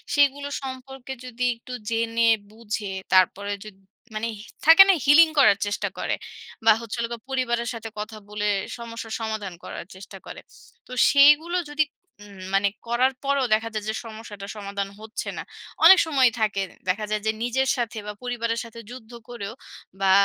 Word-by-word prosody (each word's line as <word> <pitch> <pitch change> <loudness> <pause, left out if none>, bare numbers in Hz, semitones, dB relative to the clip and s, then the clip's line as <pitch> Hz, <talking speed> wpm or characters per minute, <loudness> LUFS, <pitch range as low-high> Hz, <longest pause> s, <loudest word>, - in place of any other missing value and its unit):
সেগুলো 285 0 +3 0.2
সম্পর্কে 265 0 -7
যদি 250 0 -5
একটু 240 +2 -11 0.2
জেনে 230 0 +1 0.2
বুঝে 215 -2 -5 0.2
তারপরে 190 +2 +3
যদি, 210 -3 -12 0.4
মানে 215 +2 -2 0.4
থাকে 325 +5 +10
না, - - +8
healing 315 +3 +7
করার 230 -7 +6
চেষ্টা 205 +1 -2
করে; - - -1 0.5
বা 225 - +8
হচ্ছে 230 -2 -6
হলো 230 - 0
গা - - -5
পরিবারের 240 -3 -1
সাথে 225 -1 -7
কথা 215 +1 -6
বলে 210 0 -3 0.3
সমস্যার 230 -1 -7
সমাধান 220 -4 -4
করার - - -7
চেষ্টা 195 +1 -11
করে; - - -9 0.5
তো - - -15 0.2
সেইগুলো 295 +5 +6
যদি 300 +1 +2 0.4
উম 200 -2 -14
মানে 195 +1 +3 0.2
করার 250 +3 +2
পরেও 280 -1 +1
দেখা 225 +1 +1
যায় 215 -1 -3
যে, - - 0
সমস্যাটা 215 -3 -9
সমাধান 200 -1 -4
হচ্ছে 220 +1 -6
না। - - -4 0.4
অনেক 380 +3 +10
সময়ই 270 -6 +4
থাকে 210 -3 +1 0.3
দেখা 210 +4 0
যায় 215 0 0
যে, 220 - +3
নিজের 260 +2 0
সাথে 235 -2 -3
বা 210 - -4
পরিবারের 230 -2 -2
সাথে 230 0 -11
যুদ্ধ 245 -2 -11 0.2
করেও 225 -3 -6 0.5
বা 190 -1 +4
230 Hz, 165 wpm, -24 LUFS, 210-260 Hz, 0.5 s, থাকে